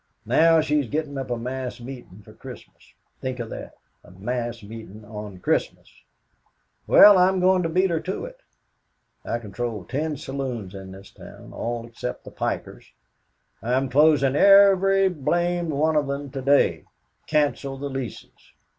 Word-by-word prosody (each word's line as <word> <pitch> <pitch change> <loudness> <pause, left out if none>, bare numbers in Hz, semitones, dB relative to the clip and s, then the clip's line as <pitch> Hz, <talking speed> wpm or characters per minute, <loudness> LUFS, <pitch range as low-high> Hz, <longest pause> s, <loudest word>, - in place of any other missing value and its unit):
Now, 165 0 +4
she's 150 -3 0
gettin' 150 -1 -3
up 135 - -5
a 120 - -1
mass 125 +1 -5
meetin' 120 -6 -10
for - - -15
Christmas - - -13 0.3
think 130 -1 -3
of 115 -2 -6
that, - - -8 0.3
a - - -17
mass 115 +5 -4
meetin' 110 0 -10
on 105 -2 -8
Christmas. 90 - -2 0.9
Well, 205 -2 +8
I'm 185 +1 +3
goin' 185 0 +3
to 165 - -1
beat 185 +2 +2
her 165 - 0
to 185 - -4
it. - - -11 0.8
"I 115 - -2
control 110 -1 -5
ten 150 +2 -3
saloons 130 -8 -5
in 95 -1 -9
this 95 +1 -13
town - - -13
all 120 0 -4
except 115 - -6
the - - -11
pikers - - -5 0.7
I'm 130 +3 0
closing 140 0 +4
every 195 +1 +6
blamed 175 +1 -1
one 155 +2 +1
of 150 -2 +1
them 140 0 -4
to 135 -1 -5
day 140 +2 +2 0.4
canceled 140 -3 0
the 140 - -3
leases. 130 -5 -8
135 Hz, 155 wpm, -24 LUFS, 115-160 Hz, 0.9 s, Well